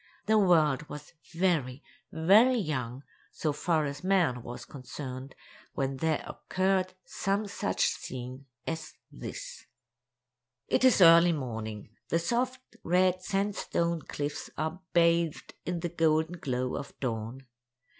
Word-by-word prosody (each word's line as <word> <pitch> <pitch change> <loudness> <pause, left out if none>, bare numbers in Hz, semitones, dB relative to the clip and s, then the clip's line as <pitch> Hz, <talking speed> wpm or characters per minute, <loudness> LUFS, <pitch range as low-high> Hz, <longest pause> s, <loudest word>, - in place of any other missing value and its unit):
The 220 0 +4
world 155 -7 +3
was 150 0 -9 0.2
very, 160 -7 0 0.3
very 210 +11 +5
young, 135 - -3 0.3
so 155 -2 -1
far 160 0 +1
as 140 +2 -5
man 180 -10 +2
was 120 +1 -8
concerned, 130 0 -8 0.4
when 135 -1 -1
there 160 +1 0
occurred 185 0 0
some 200 +2 -1
such 200 - 0
scene 130 +2 -4 0.2
as 160 -2 -5 0.2
this: - - -8 1.0
It - - +2
is 255 -6 +6
early 170 0 +8
morning. 110 -7 -5 0.2
The 165 - +2
soft, 245 +9 0 0.2
red 185 +1 +3
sandstone 185 -4 -1
cliffs 145 0 -4
are 160 +4 -3
bathed 170 -2 +2
in 175 -1 -2
the 175 - -2
golden 160 +1 +1
glow 125 -2 -2
of - - -8
dawn. 120 +1 -4
160 Hz, 125 wpm, -29 LUFS, 135-185 Hz, 1.0 s, early